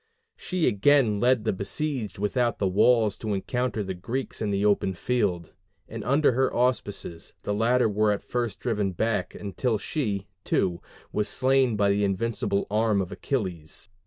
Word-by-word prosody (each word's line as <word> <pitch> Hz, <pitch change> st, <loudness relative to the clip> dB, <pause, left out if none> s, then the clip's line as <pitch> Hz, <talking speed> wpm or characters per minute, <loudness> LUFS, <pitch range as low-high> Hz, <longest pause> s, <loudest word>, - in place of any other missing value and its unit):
She 180 Hz, -2 st, -1 dB
again 110 Hz, 0 st, +3 dB
led 125 Hz, -1 st, +3 dB
the 110 Hz, -, +1 dB
besieged 110 Hz, -, -3 dB
without 120 Hz, +4 st, 0 dB
the 100 Hz, -, +1 dB
walls 110 Hz, +2 st, +3 dB
to 105 Hz, -2 st, -2 dB
encounter 125 Hz, +2 st, -2 dB
the 95 Hz, -1 st, -4 dB
Greeks 120 Hz, +9 st, -4 dB
in 110 Hz, -, 0 dB
the 100 Hz, 0 st, 0 dB
open 100 Hz, -2 st, +2 dB
field; 95 Hz, -7 st, -1 dB, 0.3 s
and 115 Hz, -1 st, -6 dB
under 140 Hz, +3 st, +3 dB
her 130 Hz, +2 st, +1 dB
auspices 100 Hz, -9 st, -2 dB
the 105 Hz, -, -1 dB
latter 115 Hz, +3 st, +3 dB
were 105 Hz, 0 st, +2 dB
at 100 Hz, -, -2 dB
first 120 Hz, -3 st, -2 dB
driven 105 Hz, -6 st, -1 dB
back, 110 Hz, +4 st, -1 dB
until 110 Hz, +3 st, -1 dB
she, 105 Hz, -, -2 dB, 0.2 s
too, 85 Hz, -2 st, 0 dB, 0.3 s
was 105 Hz, 0 st, -1 dB
slain 130 Hz, -2 st, +2 dB
by 100 Hz, -1 st, +3 dB
the 100 Hz, +1 st, +1 dB
invincible 100 Hz, 0 st, 0 dB
arm 110 Hz, -1 st, +2 dB
of 95 Hz, 0 st, -2 dB
Achilles. 95 Hz, -, -3 dB
105 Hz, 160 wpm, -26 LUFS, 100-125 Hz, 0.3 s, again